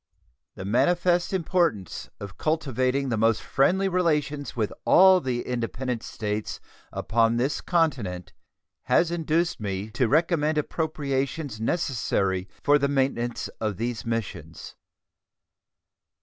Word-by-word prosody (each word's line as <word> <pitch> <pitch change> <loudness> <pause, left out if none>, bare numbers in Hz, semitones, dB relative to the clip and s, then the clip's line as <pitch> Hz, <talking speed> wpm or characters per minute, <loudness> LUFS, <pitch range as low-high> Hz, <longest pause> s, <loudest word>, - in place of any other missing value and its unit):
The 95 - -7
manifest 175 - +2
importance 170 - -1
of 100 -1 -8
cultivating 135 -3 0
the 115 -3 0
most 115 -1 +3
friendly 190 +8 +2
relations 150 -6 0
with 110 -4 -1
all 190 -1 +6
the 125 -4 -2
independent 125 0 -3
States 105 -1 -4 0.3
upon 115 0 +1
this 135 +5 0
continent 125 - -1 0.5
has 170 -1 +3
induced 170 +1 0
me 100 0 -4
to 120 +2 +1
recommend 155 +1 +2
appropriations 145 -4 -2
necessary 105 - 0
for 145 0 +5
the 140 - +2
maintenance 130 -4 -1
of 105 -4 -2
these 120 +1 -3
missions. 100 -9 -5
130 Hz, 110 wpm, -26 LUFS, 110-160 Hz, 0.5 s, all